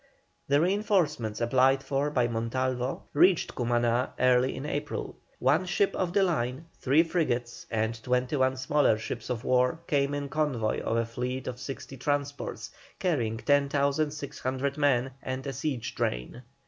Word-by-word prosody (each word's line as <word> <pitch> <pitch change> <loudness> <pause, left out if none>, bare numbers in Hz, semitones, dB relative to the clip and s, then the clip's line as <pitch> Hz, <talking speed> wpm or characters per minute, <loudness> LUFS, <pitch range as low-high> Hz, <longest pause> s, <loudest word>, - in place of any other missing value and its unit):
The 140 +1 +4
reinforcements 175 - +1
applied 130 +3 +3
for 140 +1 0
by 125 -5 +2
Montalvo 125 +2 -2
reached 180 +3 +4
Cumaná 120 0 +1
early 130 0 +3
in 135 - -6
April. 145 0 -3 0.2
One 150 +8 +2
ship 195 +2 +1
of 180 -2 -1
the 195 +2 +3
line, 145 -4 -1
three 140 +5 +4
frigates, 130 -8 -2
and 110 0 -1
twenty 125 +3 0
one 130 -1 +2
smaller 130 -3 +3
ships 110 +2 -6
of 120 -2 -2
war 125 +3 +2
came 140 -1 +1
in 145 0 -3
convoy 135 -7 0
of 115 - -1
a 115 - +1
fleet 125 +3 -4
of 125 -1 -5
sixty 135 +1 -7
transports, 145 +1 -3 0.3
carrying 120 -11 0
10,600 140 0 0
men 135 -3 +2
and 130 +1 -4
a 135 - -3
siege 135 -2 -3
train. 60 - -3
130 Hz, 145 wpm, -28 LUFS, 125-145 Hz, 0.3 s, The